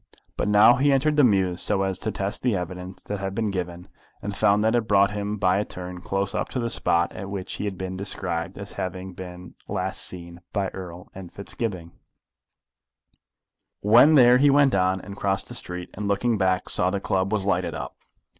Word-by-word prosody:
But - - -1
now 105 +4 +6
he 140 +2 +3
entered 145 +3 +2
the 150 - +5
mews 95 -6 +2
so 95 -2 +1
as 95 -1 -2
to - - -2
test 100 +2 -3
the 125 -4 +1
evidence 90 +1 -6
that 105 -1 -4
had 95 0 -4
been 110 -2 0
given, 90 -2 -5 0.4
and 100 0 -4
found 100 +2 +3
that 110 - +2
it 120 -2 +1
brought 100 -1 +4
him 105 0 -3
by 95 -1 +2
a - - +1
turn 90 -2 -8
close 95 +1 -2
up - - -2
to 130 - -3
the 115 -1 -2
spot 85 -5 +1
at 95 - -7
which 95 -2 -5
he - - -4
had 100 -2 -4
been 95 0 -5
described 90 -4 -2
as - - -7
having 95 0 -5
been 90 0 -9
last - - -3
seen 85 -1 -7
by 100 -2 0
Erle 90 -2 -9
and 95 -2 -9
Fitzgibbon. 100 -4 -5 1.9
When 120 +9 +6
there 125 -2 +7
he 145 +1 +5
went 140 -1 +4
on, 95 0 +2
and 100 - -9
crossed 95 -1 -1
the - - -7
street, 90 0 -6
and 105 +1 -4
looking 110 +4 +1
back 95 -2 +1
saw 90 - +1
the 100 +1 -1
club 95 0 -1
was 105 -3 0
lighted 100 - 0
up. - - -6
95 Hz, 205 wpm, -25 LUFS, 90-105 Hz, 1.9 s, there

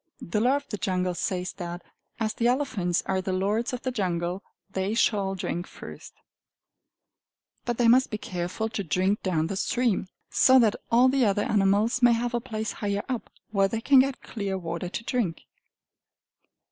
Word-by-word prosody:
The 190 +5 -2
Law 255 +4 +4
of 285 0 -4
the 210 - -4
Jungle 185 -1 0
says 180 +1 -2
that 175 -1 -6 0.4
as 220 -1 0
the 235 - +1
elephants 220 -10 0
are 190 -1 0
the 190 - -3
lords 205 +6 0
of 250 -1 -5
the 255 - -1
jungle, 180 -4 -2 0.3
they 195 +3 -1
shall 200 -4 +1
drink 175 -1 -3
first: - - -11 1.5
but 240 -1 -1
they 240 - +3
must 255 +3 +5
be 215 - -3
careful 185 -2 -3
to 215 -2 -3
drink 185 +5 +1
down 165 -5 0
the 195 - -3
stream, 235 0 0 0.2
so 260 0 +6
that 225 -5 +4 0.2
all 245 +2 +6
the 265 0 +3
other 205 -1 +2
animals 210 +5 +2
may 240 -1 +6
have 240 +1 -1
a 240 - 0
place 220 -3 -4
higher 205 -1 -2
up, 250 -3 -4 0.2
where 195 -2 +3
they 225 +3 -3
can 270 +3 +5
get 270 0 +1
clear 200 -4 -3
water 170 0 -4
to 230 - -5
drink. 225 -10 -1
205 Hz, 180 wpm, -26 LUFS, 185-240 Hz, 1.5 s, so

